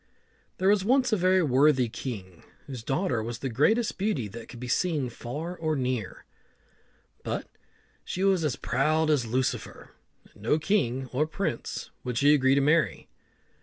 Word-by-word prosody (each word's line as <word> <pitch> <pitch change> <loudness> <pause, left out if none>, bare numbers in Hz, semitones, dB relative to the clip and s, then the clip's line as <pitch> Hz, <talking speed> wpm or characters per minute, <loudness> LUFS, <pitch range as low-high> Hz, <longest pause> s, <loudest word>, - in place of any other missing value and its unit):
There 190 - +2
was 205 -2 +3
once 255 +2 +3
a - - +6
very 185 -1 +3
worthy 135 -2 +4
king, 100 -7 -7 0.2
whose 130 -4 -7
daughter 135 - 0
was 115 +1 -4
the 135 - -4
greatest 210 - +1
beauty 190 - 0
that 115 +3 -10
could 120 - -10
be 125 - -6
seen 145 -2 0
far 150 +10 -6
or 155 -2 -1
near, 125 -6 -3 1.0
but - - -3 0.6
she 185 - -3
was 190 -4 +3
as 150 -5 0
proud 155 +5 +1
as 130 -6 +1
Lucifer, 125 -1 -2 0.4
and - - -19
no 115 +8 +2
king 135 - 0
or 150 +4 +1
prince 160 -8 -4
would 125 -2 -3
she 145 +3 +5
agree 135 -2 +4
to 140 - +3
marry. 150 +3 +1
140 Hz, 165 wpm, -27 LUFS, 125-175 Hz, 1.0 s, a